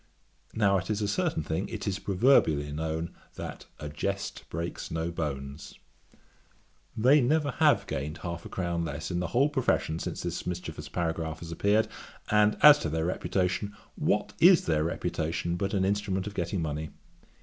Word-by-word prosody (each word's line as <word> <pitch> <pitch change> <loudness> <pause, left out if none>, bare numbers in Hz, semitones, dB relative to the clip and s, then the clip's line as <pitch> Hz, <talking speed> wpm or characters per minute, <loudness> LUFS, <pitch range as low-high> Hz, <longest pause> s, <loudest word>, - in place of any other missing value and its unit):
Now 100 -3 +3
it 95 - -7
is 105 0 0
a - - 0
certain 155 - 0
thing, 80 +6 -2
it - - -5
is 100 0 -1
proverbially 90 - +3
known, 80 +2 -3 0.2
that - - -7
a 75 - -5
jest 95 +7 -3
breaks 85 +2 -4
no 80 +1 -2
bones. 70 -3 -5 1.2
They 130 +7 +6
never 145 +3 +2
have 155 -2 +4
gained 75 +4 -4
half 85 -1 -4
a - - -9
crown 85 -2 -2
less 75 +1 -4
in 90 - -1
the 90 - -1
whole 125 - +3
profession 130 - 0
since - - -4
this - - -4
mischievous 80 -4 -5
paragraph 80 0 -2
has 85 -1 -7
appeared; 105 +6 +2 0.4
and, 105 0 +4
as 150 0 +10
to 80 - -2
their 80 +1 -1
reputation, 95 +3 -1 0.2
What 105 0 0
is 180 -1 +7
their 80 -2 +2
reputation 80 +1 -2
but 100 +3 -1
an 95 -1 +2
instrument 100 -1 0
of 105 - -5
getting 85 -1 -2
money? 75 0 -3
90 Hz, 170 wpm, -29 LUFS, 80-105 Hz, 1.2 s, as